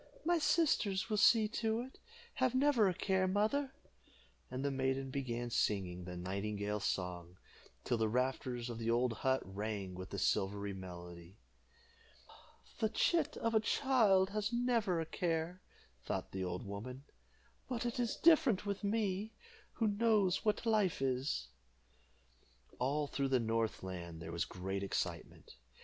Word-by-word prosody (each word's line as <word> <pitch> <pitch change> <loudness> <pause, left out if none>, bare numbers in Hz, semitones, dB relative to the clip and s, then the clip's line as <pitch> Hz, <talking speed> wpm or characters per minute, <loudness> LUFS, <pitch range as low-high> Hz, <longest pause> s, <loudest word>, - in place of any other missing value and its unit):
"My 345 0 +3
sisters 230 - +2
will 210 - +2
see 215 +1 +6
to 225 +1 0
it. 260 +2 -10 0.4
Have 255 -1 +3
never 260 -7 +4
a - - 0
care, 190 0 +1
mother;" 220 +9 +1 0.8
and 130 +2 -3
the 140 - +1
maiden 135 0 -1
began 120 -3 -3
singing 90 -5 0
the 90 0 -6
nightingale's 100 +2 -2
song, 90 -1 -3 0.5
till 120 -2 0
the 110 -1 +2
rafters 125 0 -1
of 120 -1 -5
the 115 0 -2
old 120 +1 +2
hut 130 +4 +1
rang 100 0 -4
with 95 +1 -7
the - - -5
silvery 100 +1 0
melody. 90 0 -9 1.4
"The 220 - +2
chit 310 +6 +1
of 230 0 0
a 220 - +5
child 215 -6 +3
has 210 +1 -1
never 235 -7 +1
a 165 - -1
care," 170 +2 -2 0.4
thought - - -3
the 95 -1 -3
old 90 0 -4
woman, 120 +7 -6 0.7
"but 245 -2 -2
it 240 +1 -2
is 240 -2 0
different 310 - +4
with 200 0 -3
me, 205 0 -1 0.4
who 225 - +1
know 210 -2 +3
what 210 +1 0
life 215 -5 +2
is." 130 - -1 1.3
All 145 +4 +1
through 140 -1 -1
the 130 -1 +3
north 115 -3 -1
land 85 -3 -6
there 80 0 -7
was 85 +1 -1
great 95 +2 -4
excitement. 95 -8 -4
135 Hz, 150 wpm, -35 LUFS, -, 1.4 s, see